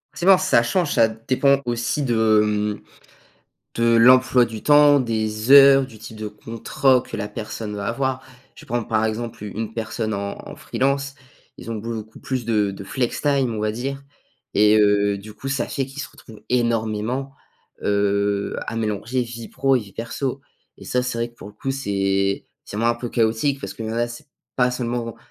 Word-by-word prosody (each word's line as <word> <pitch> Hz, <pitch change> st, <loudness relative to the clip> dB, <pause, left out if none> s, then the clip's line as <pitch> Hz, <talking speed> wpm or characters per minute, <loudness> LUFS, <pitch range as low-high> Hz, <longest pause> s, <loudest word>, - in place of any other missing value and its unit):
Forcement, 185 Hz, +1 st, +5 dB
ça 185 Hz, -10 st, +3 dB
change. 165 Hz, +5 st, 0 dB
Ça 115 Hz, -, +5 dB
dépend 130 Hz, +5 st, +1 dB
aussi 120 Hz, +4 st, -1 dB
de, 110 Hz, -4 st, +3 dB
hem, 105 Hz, 0 st, -1 dB, 0.9 s
de 115 Hz, 0 st, +3 dB
l'emploi 125 Hz, +1 st, +6 dB
du 110 Hz, -2 st, -7 dB
temps, 145 Hz, -1 st, +6 dB
des 110 Hz, -1 st, -2 dB
heures, 135 Hz, -1 st, +8 dB
du 110 Hz, -4 st, -14 dB
type 110 Hz, -, -10 dB
de 110 Hz, 0 st, -5 dB
contrat 115 Hz, +4 st, 0 dB
que -, -, -6 dB
la 105 Hz, -1 st, -4 dB
personne 105 Hz, 0 st, -6 dB
va 100 Hz, -1 st, -4 dB
avoir. 130 Hz, +2 st, -1 dB, 0.3 s
Je -, -, -14 dB
vais -, -, -22 dB
prendre, 120 Hz, -1 st, -2 dB
par 110 Hz, 0 st, +1 dB
exemple 110 Hz, 0 st, -4 dB
u -, -, -5 dB
une 110 Hz, +1 st, -5 dB
personne 110 Hz, -1 st, -3 dB
en 100 Hz, 0 st, -4 dB
en -, -, -8 dB
freelance. 140 Hz, +1 st, -1 dB, 0.4 s
Ils 115 Hz, -, -8 dB
ont -, -, -2 dB
beaucoup 110 Hz, 0 st, -6 dB
plus 130 Hz, -3 st, -3 dB
de 105 Hz, -3 st, +1 dB
de 100 Hz, 0 st, -8 dB
flextime, 130 Hz, +2 st, 0 dB
on 110 Hz, -, -4 dB
va 105 Hz, 0 st, 0 dB
dire. 135 Hz, +4 st, -4 dB, 0.5 s
Et 105 Hz, +1 st, +5 dB
heu, 100 Hz, -1 st, +3 dB
du 105 Hz, +2 st, -11 dB
coup, 135 Hz, +5 st, -7 dB
ça 135 Hz, -3 st, -1 dB
fait 135 Hz, -1 st, -2 dB
qu'ils 140 Hz, +2 st, -7 dB
se -, -, -7 dB
retrouvent 110 Hz, -3 st, -15 dB
énormément, 115 Hz, +2 st, -1 dB, 0.5 s
heu, 100 Hz, 0 st, 0 dB
à 115 Hz, -, -4 dB
mélanger 110 Hz, +3 st, -1 dB
vie 115 Hz, -1 st, -8 dB
pro 135 Hz, -1 st, +2 dB
et 125 Hz, -, 0 dB
vie 100 Hz, -2 st, -12 dB
perso. 130 Hz, +4 st, -4 dB, 0.4 s
Et -, -, -12 dB
ça, 125 Hz, -, 0 dB
c'est 125 Hz, -2 st, -3 dB
vrai 115 Hz, -, -1 dB
que -, -, -28 dB
pour 100 Hz, -, -11 dB
le 105 Hz, -, -15 dB
coup, 135 Hz, +3 st, -4 dB
c'est 100 Hz, -6 st, 0 dB, 0.2 s
c'est -, -, -8 dB
moins 115 Hz, +2 st, +2 dB
un 120 Hz, -, 0 dB
peu 120 Hz, 0 st, -6 dB
chaotique 115 Hz, +5 st, +1 dB
parce -, -, -6 dB
que, 115 Hz, -, -7 dB
là, 115 Hz, +2 st, -1 dB
c'est 120 Hz, -, -10 dB, 0.3 s
pas 125 Hz, -1 st, +3 dB
seulement, 120 Hz, -2 st, -3 dB
115 Hz, 195 wpm, -22 LUFS, 110-130 Hz, 0.9 s, heures